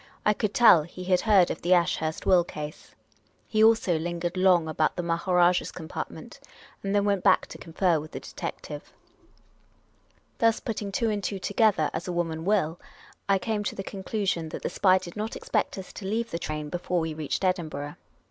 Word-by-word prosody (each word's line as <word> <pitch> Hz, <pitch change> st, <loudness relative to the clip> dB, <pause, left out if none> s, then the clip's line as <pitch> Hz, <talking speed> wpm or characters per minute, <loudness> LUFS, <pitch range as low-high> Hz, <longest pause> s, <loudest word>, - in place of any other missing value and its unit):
I 210 Hz, -, +5 dB
could 210 Hz, 0 st, -1 dB
tell 225 Hz, -9 st, +7 dB
he 175 Hz, +4 st, -9 dB
had 180 Hz, 0 st, +2 dB
heard 200 Hz, -5 st, +4 dB
of -, -, -5 dB
the 180 Hz, +2 st, +4 dB
Ashurst 160 Hz, -2 st, 0 dB
will 180 Hz, -2 st, +5 dB
case. 150 Hz, -3 st, -8 dB, 0.5 s
He 215 Hz, 0 st, +2 dB
also 220 Hz, -7 st, +4 dB
lingered 175 Hz, +1 st, -3 dB
long 185 Hz, -3 st, +4 dB
about 155 Hz, 0 st, 0 dB
the 175 Hz, -, -3 dB
Maharajah's 175 Hz, +1 st, +2 dB
com 160 Hz, -3 st, -9 dB
partment, -, -, -7 dB, 0.4 s
and 195 Hz, +1 st, -1 dB
then 205 Hz, 0 st, +3 dB
went 200 Hz, -3 st, +1 dB
back -, -, +4 dB
to -, -, -11 dB
confer 170 Hz, 0 st, +1 dB
with 155 Hz, +1 st, -8 dB
the -, -, -7 dB
detective. -, -, -7 dB, 1.5 s
Thus, 230 Hz, 0 st, +3 dB
putting 210 Hz, -3 st, -4 dB
two 225 Hz, +2 st, 0 dB
and 205 Hz, -1 st, -2 dB
two 195 Hz, +1 st, -2 dB
together, 205 Hz, -4 st, +2 dB
as 170 Hz, -, -4 dB
a -, -, -2 dB
woman 165 Hz, -2 st, -2 dB
will, 185 Hz, -5 st, +1 dB, 0.5 s
I 195 Hz, -, +5 dB
came 210 Hz, +1 st, -2 dB
to -, -, -2 dB
the 195 Hz, -, -5 dB
conclusion 190 Hz, -4 st, -2 dB
that -, -, -7 dB
the -, -, -2 dB
spy 185 Hz, -1 st, +4 dB
did 180 Hz, -2 st, -8 dB
not 215 Hz, +2 st, -4 dB
expect 215 Hz, -, -1 dB
us 190 Hz, -, -8 dB
to 190 Hz, -, -7 dB
leave 230 Hz, +3 st, -2 dB
the 170 Hz, -, -3 dB
train 150 Hz, -2 st, -4 dB
before 175 Hz, +2 st, -1 dB
we 160 Hz, -1 st, -2 dB
reached 150 Hz, -2 st, -3 dB
Edinburgh. 155 Hz, -6 st, -2 dB
180 Hz, 195 wpm, -27 LUFS, 165-200 Hz, 1.5 s, tell